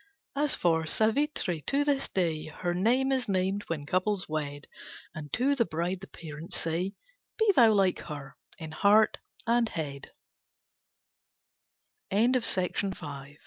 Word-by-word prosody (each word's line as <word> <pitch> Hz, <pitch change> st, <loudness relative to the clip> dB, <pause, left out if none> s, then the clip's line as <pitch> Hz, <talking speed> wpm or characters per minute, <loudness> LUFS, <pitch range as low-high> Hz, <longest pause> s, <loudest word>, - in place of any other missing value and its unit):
As 290 Hz, 0 st, +1 dB
for 160 Hz, -2 st, +1 dB
Savitri, 220 Hz, -, +1 dB
to 280 Hz, +1 st, +2 dB
this 280 Hz, -2 st, 0 dB
day 165 Hz, -5 st, -1 dB
Her 175 Hz, +3 st, -3 dB
name 245 Hz, +9 st, +2 dB
is 255 Hz, -4 st, 0 dB
named, 190 Hz, +1 st, 0 dB
when 155 Hz, -3 st, -3 dB
couples 185 Hz, +4 st, 0 dB
wed, 145 Hz, -2 st, -4 dB, 0.5 s
And 150 Hz, -2 st, -8 dB
to 265 Hz, +4 st, +3 dB
the 265 Hz, -4 st, +3 dB
bride 175 Hz, 0 st, -2 dB
the 195 Hz, -, -9 dB
parents 165 Hz, +3 st, -7 dB
say, 175 Hz, +5 st, -2 dB, 0.4 s
Be 445 Hz, -2 st, +4 dB
thou 230 Hz, -3 st, +7 dB
like 195 Hz, -3 st, +3 dB
her, 145 Hz, -3 st, -8 dB, 0.2 s
in 160 Hz, -2 st, -7 dB
heart 210 Hz, +6 st, +4 dB, 0.3 s
and 235 Hz, 0 st, +2 dB
head. 140 Hz, -4 st, -5 dB, 2.0 s
_Butea 225 Hz, -4 st, +2 dB
frondosa. 145 Hz, -7 st, -4 dB
185 Hz, 135 wpm, -29 LUFS, 160-230 Hz, 2.0 s, thou